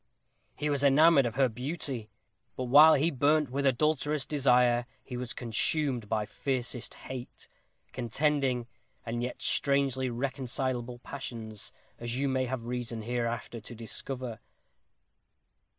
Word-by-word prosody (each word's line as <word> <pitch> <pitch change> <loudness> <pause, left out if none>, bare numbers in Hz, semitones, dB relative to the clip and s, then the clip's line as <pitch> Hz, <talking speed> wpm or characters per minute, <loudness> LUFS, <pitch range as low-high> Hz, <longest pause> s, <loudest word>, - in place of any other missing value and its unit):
He 150 - -2
was 145 -1 +1
enamored 140 0 +6
of 115 - -5
her 135 -1 +4
beauty. 125 -1 -4 0.5
But 130 - -3
while 150 +6 +8
he 155 +5 +2
burnt 145 0 +2
with 140 +1 +1
adulterous 150 +1 +1
desire, 125 -4 +3 0.2
he 125 - -7
was 125 -1 -4
consumed 120 0 -1
by 110 -1 0
fiercest 125 0 -3
hate 130 -2 -8 0.4
contending, 130 0 0 0.4
and 120 +1 -2
yet 125 0 -4
strangely 135 -2 +1
reconcilable 125 -1 -2
passions 115 -5 -7 0.3
as 120 +1 -3
you 140 +1 +1
may 130 -1 +1
have 125 -2 -4
reason, 120 -2 -4
hereafter, 120 0 -3
to 120 +3 -9
discover." 120 +1 -5
130 Hz, 125 wpm, -30 LUFS, 120-140 Hz, 0.5 s, while